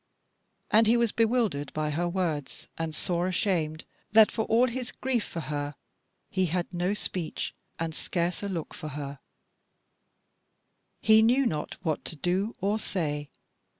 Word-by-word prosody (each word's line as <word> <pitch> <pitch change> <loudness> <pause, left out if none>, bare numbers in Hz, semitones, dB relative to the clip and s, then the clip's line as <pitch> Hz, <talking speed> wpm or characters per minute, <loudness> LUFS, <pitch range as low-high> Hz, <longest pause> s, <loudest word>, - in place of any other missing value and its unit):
And 220 +1 +6
he 235 +2 +5
was 235 -2 +2
bewildered 220 - +1
by 155 0 -1
her 175 +4 0
words 170 -6 -2
and 160 -1 -3
sore 175 +2 0
ashamed 170 -5 0 0.3
that 220 -1 +8
for 220 - -1
all 230 +3 +4
his 255 0 -3
grief 255 -4 0
for 165 - -5
her 145 -1 -3 0.6
he 185 -1 +2
had 175 +2 -2
no 180 +3 0
speech, 180 -5 -3 0.2
and 165 -1 -2
scarce 175 +1 -1
a 200 - -3
look 170 -5 -4
for 155 - -7
her; 140 -1 -5 1.8
he 220 0 +7
knew 250 +5 +4
not 150 -9 -2
what 160 -4 -1
to - - -4
do 185 - 0
or 205 +3 +1
say. 150 -8 -2
180 Hz, 150 wpm, -28 LUFS, 155-220 Hz, 1.8 s, that